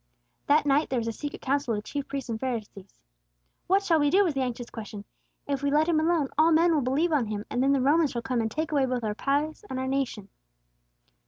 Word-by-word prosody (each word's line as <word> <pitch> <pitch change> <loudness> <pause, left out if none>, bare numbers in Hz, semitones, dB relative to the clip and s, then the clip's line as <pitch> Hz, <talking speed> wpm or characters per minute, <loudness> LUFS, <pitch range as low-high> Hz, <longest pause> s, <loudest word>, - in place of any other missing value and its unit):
That 295 +1 +4
night 290 +2 +2
there 260 - -1
was 230 -1 -2
a - - 0
secret 290 +6 -7
council 270 -3 0
of - - -2
the - - -3
chief 280 +5 -5
priests 275 -2 -5
and 225 -2 -3
the - - -9
Pharisees. 215 -6 -5 0.7
"What 390 +2 +3
shall 330 -5 +3
we 290 -1 +3
do," 390 +6 +4
was 345 -6 0
the 270 - -1
anxious 245 -1 -4
question. 210 -2 -8 0.4
"If 280 -1 -1
we 285 - 0
let 300 +2 +3
Him 330 -2 +2
alone, 315 -3 +1
all 320 +2 +5
men 330 +1 +4
will 300 - +2
believe 280 +7 +1
on 260 -7 +1
Him; 210 0 -4
and 245 - 0
the 275 +1 +3
Romans 295 +4 +3
shall 235 -2 -4
come 245 0 -1
and 225 - -1
take 310 +7 -3
away 280 -3 +2
both 250 -2 -2
our 215 -1 -1
place 290 - -1
and 260 - -4
our 260 - -2
nation." 260 -7 -2
275 Hz, 250 wpm, -27 LUFS, 235-305 Hz, 0.7 s, all